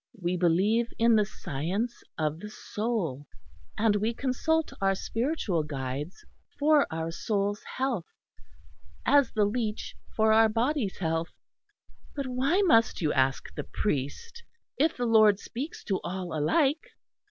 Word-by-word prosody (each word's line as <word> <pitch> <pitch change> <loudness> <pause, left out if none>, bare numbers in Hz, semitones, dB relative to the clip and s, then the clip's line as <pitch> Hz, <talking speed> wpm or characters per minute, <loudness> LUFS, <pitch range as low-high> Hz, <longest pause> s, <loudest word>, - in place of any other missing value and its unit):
We 175 0 -1
believe 190 +7 +2
in 230 0 +5
the 210 -2 +3
science 195 - -3 0.2
of 155 0 -1
the 210 - -7
soul; 205 - -3 0.5
and 215 -1 +3
we 220 +3 -1
consult 315 +6 0
our 195 0 +3
spiritual 225 - -1
guides 145 +2 -5 0.3
for 295 0 +4
our 160 +1 -3
soul's 205 +3 -1 0.2
health, 255 -10 -1 1.0
as 285 -3 +4
the 210 -2 +3
leech 215 0 -2 0.2
for 220 0 +4
our 225 0 +6
body's 235 -1 0
health." 165 -1 -2 0.8
"But 280 -1 -2
why 270 +10 +1
must 230 - +4
you 150 - +2
ask 135 0 0
the - - -4
priest, 210 - -3 0.3
if 310 +4 +1
the 245 - -1
Lord 215 -3 +6
speaks 260 +8 -6
to 195 -2 -1
all 180 -2 -4
alike?" 275 - +2
215 Hz, 135 wpm, -28 LUFS, 170-250 Hz, 1.0 s, our